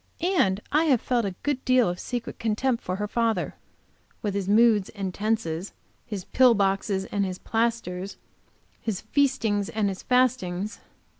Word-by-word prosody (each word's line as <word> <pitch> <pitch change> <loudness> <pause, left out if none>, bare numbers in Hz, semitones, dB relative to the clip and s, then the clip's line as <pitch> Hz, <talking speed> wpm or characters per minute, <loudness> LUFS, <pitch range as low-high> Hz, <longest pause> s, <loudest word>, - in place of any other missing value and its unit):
And 190 +1 +2
I 310 +3 +3
have 270 -6 +4
felt 240 -2 0
a 190 -2 -3
good 285 -3 -1
deal 255 -2 +4
of 180 0 -3
secret 245 -2 -5
contempt 230 +2 0
for 180 - -2
her 210 +2 -2
father, 230 +1 0 0.7
with 205 -2 -1
his 200 -1 -2
moods 215 -2 +4
and 195 -3 -4
tenses, 205 -5 -2 0.3
his 205 -6 -5
pill 255 -2 +5
boxes 195 -1 0
and 200 -1 +1
his 185 -1 -3
plasters, 225 -5 -2 0.6
his 215 -5 -3
feastings 220 -5 +1
and 215 -2 0
his 190 - -5
fastings. 220 -6 +1
215 Hz, 155 wpm, -26 LUFS, 195-235 Hz, 0.7 s, pill